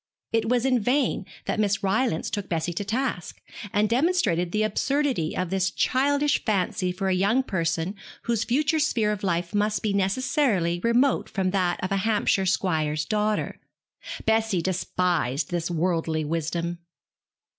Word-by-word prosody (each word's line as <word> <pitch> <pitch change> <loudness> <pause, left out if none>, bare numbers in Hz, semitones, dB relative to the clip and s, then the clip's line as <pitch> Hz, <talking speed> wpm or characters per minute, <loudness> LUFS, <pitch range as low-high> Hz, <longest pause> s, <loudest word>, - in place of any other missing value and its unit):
It 225 0 +1
was 245 0 +2
in 255 -2 +3
vain 255 +6 0 0.2
that - - -1
Miss 200 -2 +1
Rylance 195 -2 0
took 205 -1 -3
Bessie 170 0 -1
to 185 - -3
task, 225 -4 -3 0.3
and 210 +1 +2
demonstrated 230 - +1
the 215 +2 +1
absurdity 255 - 0
of 185 -1 -2
this 190 -1 +1
childish 285 +6 +1
fancy 185 -3 0
for 190 +2 -3
a 190 - +2
young 200 +8 +2
person 170 -3 -1 0.3
whose 230 -2 0
future 300 +6 +1
sphere 230 -8 +1
of 210 -2 -3
life 170 -2 -1
must 210 +1 0
be 210 -2 0
necessarily 195 - +1
remote 245 +4 +2
from 190 -2 -1
that 185 -2 0
of 185 - -2
a 195 - +2
Hampshire 200 -2 +1
squire's 155 -5 0
daughter. 210 +3 -1 0.7
Bessie 220 -5 +2
despised 175 -7 0
this 175 -1 -1
worldly 165 -2 0
wisdom. 170 +2 -2
195 Hz, 150 wpm, -25 LUFS, 175-230 Hz, 0.7 s, in